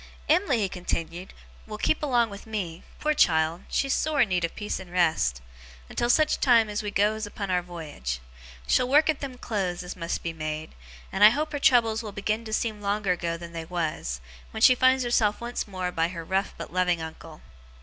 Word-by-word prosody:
'Em'ly,' 320 -5 +3
he 200 - +1
continued, 175 0 -4 0.4
'will 215 -1 -6
keep 305 - +1
along 240 -6 +2
with 200 +2 -10
me 185 -6 -4 0.2
poor 305 0 +1
child, 160 - +3
she's 275 -1 +1
sore 310 -1 +1
in 225 - +3
need 180 -2 0
of 170 - -2
peace 210 - -3
and 185 -2 -11
rest! 155 - +1 0.5
until 240 - -1
such 310 +5 +3
time 230 -5 +4
as 210 0 -2
we 210 - -3
goes 210 +2 +1
upon 200 -2 -5
our 180 -1 +2
voyage. 155 - -6 0.5
She'll 250 - +2
work 300 +3 +5
at 300 - -7
them 265 -3 -6
clothes, 185 -7 -2
as 180 - -7
must 170 -1 -3
be 165 - -3
made; 155 0 -5 0.4
and 195 - +1
I 210 - +11
hope 300 +6 -1
her 290 - -3
troubles 230 -4 +4
will 215 -3 -7
begin 215 +3 -2
to 220 - -7
seem 215 -1 -1
longer 200 -1 0
ago 170 -1 -1
than 170 0 -10
they 165 -1 -5
was, 155 - -3 0.3
wen 220 - -6
she 255 - +9
finds 260 +1 +3
herself 225 -4 +2
once 240 -1 -4
more 185 -2 -3
by 165 -1 +1
her 170 -1 -6
rough 190 +3 -1
but - - -8
loving 180 -2 +2
uncle. 160 - -9
200 Hz, 210 wpm, -26 LUFS, 170-235 Hz, 0.5 s, I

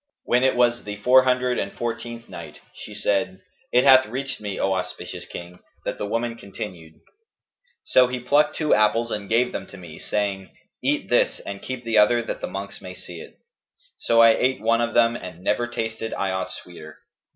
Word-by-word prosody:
When 125 +1 +2
it 130 - +3
was 120 -1 +2
the 105 0 -5
Four 125 +5 +5
Hundred 125 -1 +1
and 100 - -3
Fourteenth 120 0 -5
Night, 85 -2 -10
She - - -10
said, 95 -2 0 0.3
It 125 - +4
hath 130 -1 +7
reached 135 +3 -4
me, 105 -2 -4
O 95 - +1
auspicious 90 -1 -5
King, 90 +1 -9 0.3
that - - -3
the 105 - -2
woman 115 +2 -2
continued: 90 -6 -8 0.9
"'So 125 -1 +5
he 125 0 -3
plucked 145 +5 +2
two 155 -2 +1
apples 110 +2 +2
and 100 -1 -4
gave 125 +2 +2
them - - -5
to 100 - -12
me, 85 -4 -11
saying, 100 -2 -2 0.3
'Eat - - 0
this - - +2
and 100 -1 -7
keep 130 -1 -6
the 115 -2 +3
other 120 +3 +4
that - - -5
the - - -3
monks 100 +1 -7
may 90 -1 -8
see 85 -2 -10
it.' - - -13 0.6
So 115 0 +4
I 115 - +8
ate 130 +3 +1
one 115 +1 +2
of 120 0 -2
them 115 0 +4
and 90 -4 -9
never 120 +4 +1
tasted 115 -2 -4
I 95 -1 -1
aught 95 0 -3
sweeter. 80 -3 -11
115 Hz, 195 wpm, -23 LUFS, 100-120 Hz, 0.9 s, I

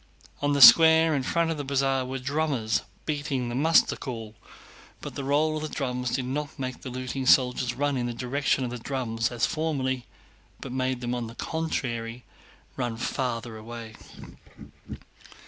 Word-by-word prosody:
On 145 0 +1
the 140 -1 +6
square 160 +1 +8
in 140 - +1
front 165 +5 0
of 160 - -3
the 145 - -3
Bazaar 135 -1 +1
were 130 +1 -4
drummers 135 -4 -1 0.2
beating 145 -5 -2
the - - -4
muster 160 +6 +4
call. 115 -5 -7 0.7
But - - -7
the 140 - -5
roll 150 +3 +1
of - - -4
the 155 - -4
drums 125 -4 -2
did 125 +1 -1
not 145 +3 -4
make 130 -2 -5
the 130 - -7
looting 130 +1 -4
soldiers 125 -1 +3
run 145 +1 0
in 120 -1 -1
the 120 - -3
direction 130 +3 0
of 125 - -3
the 125 - -5
drum 120 -3 -4
as 120 -2 0
formerly, 135 -6 -2 0.5
but 135 - -7
made 130 -1 -1
them, 120 0 -2
on 120 -2 -3
the 115 - -11
contrary, 120 -8 -3 0.5
run 120 -3 -2
farther 120 -2 -3
away. 115 0 -9
130 Hz, 170 wpm, -26 LUFS, 120-145 Hz, 0.7 s, square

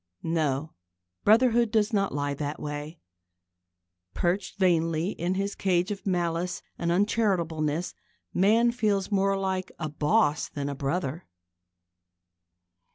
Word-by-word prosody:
No: 155 -2 -1 0.5
brotherhood 235 +1 +4
does 215 +1 +1
not 195 -2 +1
lie 145 0 -1
that 145 +1 -4
way. 150 +2 -6 1.2
Perched 175 +2 -1
vainly 165 -1 +2
in 180 0 -2
his 200 +1 -1
cage 180 0 +1
of 200 0 -5
malice 175 -1 -1
and 170 0 -1
uncharitableness, 175 -5 0 0.4
man 225 +6 +4
feels 210 -5 0
more 195 0 +2
like 190 -1 -2
a 155 -2 -3
boss 150 0 +1
than 140 -1 -4
a 140 - -4
brother. 150 +3 -3
175 Hz, 115 wpm, -27 LUFS, 155-200 Hz, 1.2 s, brotherhood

